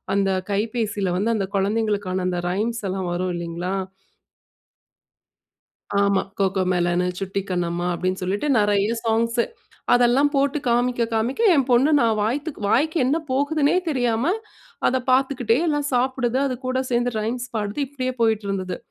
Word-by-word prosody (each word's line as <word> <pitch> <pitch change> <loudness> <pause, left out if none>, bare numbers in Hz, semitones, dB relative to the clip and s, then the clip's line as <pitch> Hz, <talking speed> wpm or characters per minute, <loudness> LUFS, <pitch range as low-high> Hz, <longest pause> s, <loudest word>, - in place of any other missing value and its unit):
அந்த 195 -1 +2 0.2
கைபேசியில 210 -3 -1
வந்து 220 +4 +1
அந்த 195 -3 -1
குழந்தைகளுக்கான 200 -2 0
அந்த 180 -1 -1
ரைம்ஸ் 220 +4 -2
எல்லாம் 185 -1 -3
வரும் 180 +1 -1
இல்லைங்களா? 170 +2 -3 2.3
ஆமா 200 -1 +2 0.2
கோகோ 190 -1 +1
மெலன், 175 0 +1 0.2
சுட்டி 195 +1 -2
கண்ணம்மா 175 -1 -1
அப்படின்னு 185 +2 -2
சொல்லிட்டு 200 +10 -1
நிறைய 205 0 +2 0.2
சாங்ஸு 230 +1 +1 0.5
அதெல்லாம் 245 +4 +4
போட்டு 280 +1 +2
காமிக்க 240 0 +1
காமிக்க 230 - -1
என் 275 - +3
பொண்ணு 255 +5 +4
நான் 225 -3 +2
வாய்த்த 280 +9 -1 0.2
வாய்க்கு 310 +9 +2
என்ன 275 +5 +2
போகுதுன்னே 285 +4 +2
தெரியாம 245 -4 0 0.6
அதை 260 - +2
பார்த்துக்கிட்டே 255 -3 +2
எல்லாம் 295 -2 0
சாப்பிடுது 255 0 +1
அது 255 - -1
கூட 255 0 0
சேர்ந்து 240 +1 +1
ரைம்ஸ் 240 +3 -3
பாடுது, 210 +4 -2
இப்படியே 255 -2 -3
போயிட்டிருந்தது. 200 -4 0
225 Hz, 135 wpm, -23 LUFS, 195-255 Hz, 2.3 s, அதெல்லாம்